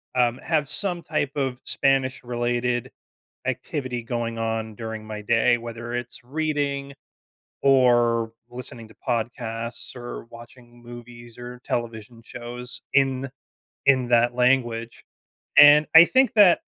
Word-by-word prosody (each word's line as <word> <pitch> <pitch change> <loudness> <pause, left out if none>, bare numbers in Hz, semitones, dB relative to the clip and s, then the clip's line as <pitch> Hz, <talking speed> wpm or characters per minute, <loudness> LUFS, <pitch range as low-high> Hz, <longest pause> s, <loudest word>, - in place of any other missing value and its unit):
um, 120 -1 +2
have 150 -3 0
some 180 -4 -1
type 145 - -2
of 130 -3 -2
Spanish-related 125 -2 0 0.6
activity 130 -4 -3
going 115 -1 -3
on 110 -1 -3
during 110 -1 -7
my 105 -1 -6
day, 115 +3 +3
whether 120 +1 -7
it's 120 0 -5
reading 140 -1 -2 0.7
or 120 -4 +3 0.2
listening 120 -2 -8
to 110 - -18
podcasts 115 0 -4
or 120 -1 -8
watching 120 +1 -15
movies 120 0 -12
or 125 0 -8
television 115 0 -4
shows 120 +1 -9
in 135 -1 +2 0.6
in 130 -3 +4
that 120 0 +3
language. 120 -2 0 0.5
And 145 +1 +8
I 165 +1 +11
think 260 +4 +3
that 200 -5 +7
120 Hz, 120 wpm, -24 LUFS, 115-135 Hz, 0.7 s, I